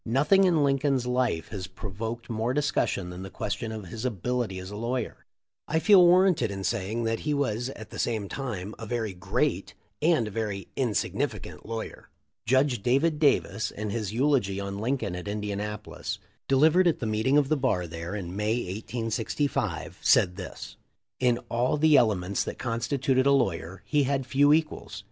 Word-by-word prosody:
Nothing 150 - +4
in 165 -5 +3
Lincoln's 135 -2 +1
life 125 -9 0
has 95 -4 -5
pro 95 +2 -8
voked 115 +3 -5
more 115 +2 -1
discussion 140 -10 0
than 90 +1 -8
the 95 - -7
question 105 +4 -4
of 110 -3 -6
his 110 +5 -6
ability 120 -2 -2
as 95 +1 -7
a - - -6
lawyer. 120 +2 -3 0.4
I 160 - +1
feel 190 +2 +7
warranted 175 - +5
in 95 -1 -5
saying 110 +2 -1
that 115 0 0
he 150 -1 -1
was 125 -3 -1
at 110 - -10
the - - -7
same 110 -4 -1
time 110 -6 -5
a 115 - -6
very 110 -3 -2
great 90 - -1 0.3
and 155 -8 +3
a - - -6
very 105 -2 -3
insignificant 115 -4 -2
lawyer. 115 0 -6 0.4
Judge 130 -1 +3
David 145 +7 +2
Davis, 110 -8 +2
in 105 0 -5
his 105 -3 -2
eulogy 120 -6 +1
on 100 0 -4
Lincoln 115 -5 -1
at 90 +2 -6
Indianapolis, 105 0 -4 0.3
delivered 160 +7 +5
at 170 - +2
the 120 - -4
meeting 110 +6 +2
of 145 -2 +3
the 155 - +3
bar 130 -11 0
there 85 +3 -6
in 90 -3 -5
May, 105 +2 0 0.2
1865, 115 +5 -2
said 90 - +4
this: 95 -1 -8 0.4
"In 125 -2 +3
all 120 +5 +1
the 155 0 +5
elements 100 -6 +2
that - - -6
constituted 130 +3 0
a - - +5
lawyer 95 -8 0
he 145 -2 +2
had 135 -1 0
few 140 +3 +4
equals. 155 -9 0
115 Hz, 175 wpm, -27 LUFS, 100-135 Hz, 0.4 s, feel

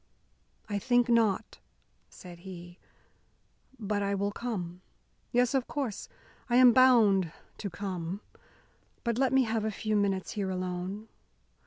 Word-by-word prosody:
"I 205 -1 -2
think 245 +3 +2
not," 225 -3 +1 0.5
said 175 -2 -12
he, 175 -1 -10 1.0
"but 210 -2 -2
I 200 0 0
will 200 +1 -1
come. 185 -7 -5 0.5
Yes, 245 +1 +2
of 265 -2 0
course, 265 -8 -4 0.4
I 240 - +2
am 250 -1 +8
bound 220 -9 +5 0.3
to 200 - -4
come. 185 0 -5 0.8
But 235 0 -1
let 265 -2 +2
me 265 0 +4
have 225 -2 -1
a 220 - 0
few 215 +1 -2
minutes 195 -2 0
here 200 -2 -2
alone. 185 +3 -4
205 Hz, 135 wpm, -29 LUFS, 185-235 Hz, 1.0 s, am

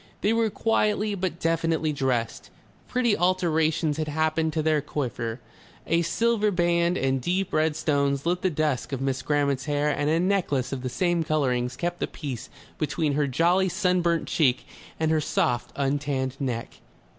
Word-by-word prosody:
They 210 - +2
were 230 -1 +2
quietly 210 -1 +1
but 180 -3 -3
definitely 165 -2 0
dressed, 130 -5 -2 0.4
pretty 240 -4 +2
alterations 160 -3 +1
had 155 -1 -2
happened 160 +1 0
to 155 -1 0
their 155 -1 +2
coiffure, 120 -5 -3 0.5
a 170 +1 +2
silver 220 +4 +1
band 175 -1 +2
and 135 -1 0
deep 185 +6 -1
red 155 0 +2
stones 140 -2 0
lit 175 +1 0
the 185 - +2
dusk 150 -4 -1
of 135 - -2
Miss 135 -1 -1
Grammont's 140 -1 0
hair 145 0 +1
and 145 0 0
a 160 +2 +2
necklace 175 -9 0
of 135 -2 -3
the 130 - -3
same 175 +4 +1
colourings 130 -5 0
kept 175 +3 -3
the - - -1
peace 130 -5 -6 0.3
between 155 -1 0
her 145 0 +1
jolly 175 +7 +2
sun 180 0 +1
burnt 170 -1 0
cheek 130 -6 +2 0.3
and 160 0 +1
her 155 -1 +2
soft 120 -4 0
untanned 140 -2 -1
neck. 125 -4 -4
155 Hz, 170 wpm, -26 LUFS, 140-175 Hz, 0.5 s, They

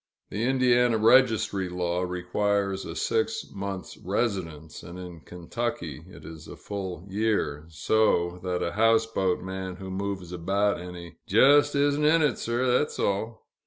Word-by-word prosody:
The 110 +3 -1
Indiana 125 -2 +3
registry 110 -4 +3
law 90 0 -1
requires 95 +2 -1
a - - -6
six 110 0 -1
months' 100 -1 -6
residence, 90 -7 -3
and 85 0 -10
in 90 -2 -9
Kentucky 90 - -5
it - - -13
is 80 -1 -10
a - - -9
full 95 -3 -6
year, 95 -8 -1
so 90 0 +1
that 90 -1 -1
a 85 - -1
houseboat 110 -4 +2
man 95 -1 -5
who 95 0 -8
moves 95 -2 -4
about 100 +3 0
any, 90 -1 -9
"jes' 145 +8 +5
isn't 145 +1 +2
in 160 +2 +4
it, 140 -7 +1
sir, 120 +2 -1
thet's 125 +4 +1
all." 110 +3 -2
100 Hz, 145 wpm, -26 LUFS, 90-115 Hz, -, jes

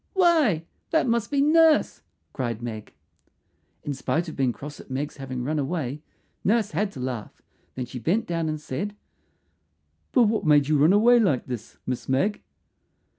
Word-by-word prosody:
"Why, 315 - +3 0.2
that 320 - +2
must 235 -2 +1
be 280 -1 +1
Nurse," 320 +1 +4 0.3
cried 120 -3 -3
Meg. 110 -3 -7 0.9
In 145 - -3
spite 160 +5 -1
of 160 - -7
being 130 -3 +1
cross 145 +4 -9
at - - -13
Meg's 140 +3 -4
having 130 -2 -5
run 150 +4 -1
away, 145 -1 -3 0.4
Nurse 215 +1 +2
had 205 0 -1
to 135 - -9
laugh; 125 -4 -5 0.4
then 130 - -3
she 125 - -7
bent 200 - 0
down 165 -3 -2
and 155 0 -3
said, 200 +9 -4 1.2
"But 250 - +5
what 220 0 +1
made 150 -3 +4
you 150 -1 +2
run 155 +5 +5
away 235 +4 +6
like 150 - +1
this, 120 -4 -7
Miss 125 0 -4
Meg?" 185 +11 +1
155 Hz, 170 wpm, -25 LUFS, 130-215 Hz, 1.2 s, away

